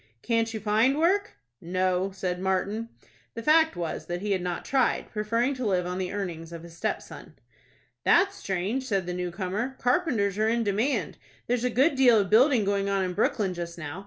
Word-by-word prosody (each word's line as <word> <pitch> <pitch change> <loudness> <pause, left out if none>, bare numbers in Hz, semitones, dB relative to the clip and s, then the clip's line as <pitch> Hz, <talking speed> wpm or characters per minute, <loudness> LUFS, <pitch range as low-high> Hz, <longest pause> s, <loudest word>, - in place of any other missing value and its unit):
"Can't 230 -1 +1
you 220 - -4
find 220 +6 +2
work?" 385 +6 +2 0.3
"No," 185 +2 0
said 185 -2 -3
Martin. 195 +4 -1 0.5
The 230 - -5
fact 320 +3 +4
was 170 -2 -4
that 175 +1 -4
he 210 - -1
had 190 -2 +1
not 175 -1 -4
tried, 265 -2 +1
preferring 230 +5 0
to 255 -1 -5
live 180 -3 +1
on 180 +1 -3
the 185 -1 -3
earnings 170 -5 -5
of 170 -1 -8
his 170 -1 -12
stepson. - - -5 0.7
"That's 395 0 +4
strange," 200 - -2
said 195 -5 0
the 180 - -3
new 180 0 -3
comer. 200 +8 -3
"Carpenters 245 - +1
are 220 +1 +2
in 235 0 +1
demand. 220 +7 -1 0.3
There's 245 0 0
a 250 - +2
good 265 +7 +3
deal 255 -4 +5
of 195 -3 0
building 245 -1 +5
going 200 0 0
on 195 -1 +1
in 180 -1 -2
Brooklyn 200 -1 0
just 170 -1 -6
now. 155 +2 -6
205 Hz, 195 wpm, -27 LUFS, 180-245 Hz, 0.7 s, deal